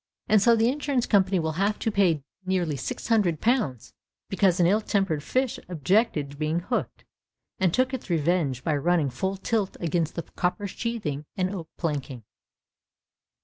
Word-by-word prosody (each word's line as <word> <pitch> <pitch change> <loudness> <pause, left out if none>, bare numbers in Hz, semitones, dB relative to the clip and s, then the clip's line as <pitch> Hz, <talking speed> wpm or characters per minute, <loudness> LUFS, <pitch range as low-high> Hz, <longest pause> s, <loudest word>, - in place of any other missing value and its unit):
And 215 -2 +5
so 235 +2 +5
the 225 0 +3
insurance 275 -2 0
company 195 -1 +3
will 160 -2 0
have 205 +1 +1
to 225 - -1
pay 180 -8 +2 0.2
nearly 180 -5 0
six 130 - -5
hundred 195 -9 +2
pounds 220 - 0 0.4
because 195 -2 +2
an 175 - +5
ill 205 +5 +3
tempered 195 -8 0
fish 255 - -1
objected 175 - +1
to 145 - -12
be 155 +1 -1
hooked, 175 +9 -2 0.5
and 190 -3 +3
took 255 +6 +1
its 255 -6 -5
revenge 160 -5 +1
by 155 - +1
running 160 -2 +1
full 190 +10 -2
tilt 205 0 -1
against 170 -1 -1 0.2
copper 185 +3 -1
sheathing 195 -9 -3
and 185 +1 0
oak 170 -5 -6
planking. 140 -7 -3
185 Hz, 160 wpm, -26 LUFS, 155-215 Hz, 0.5 s, And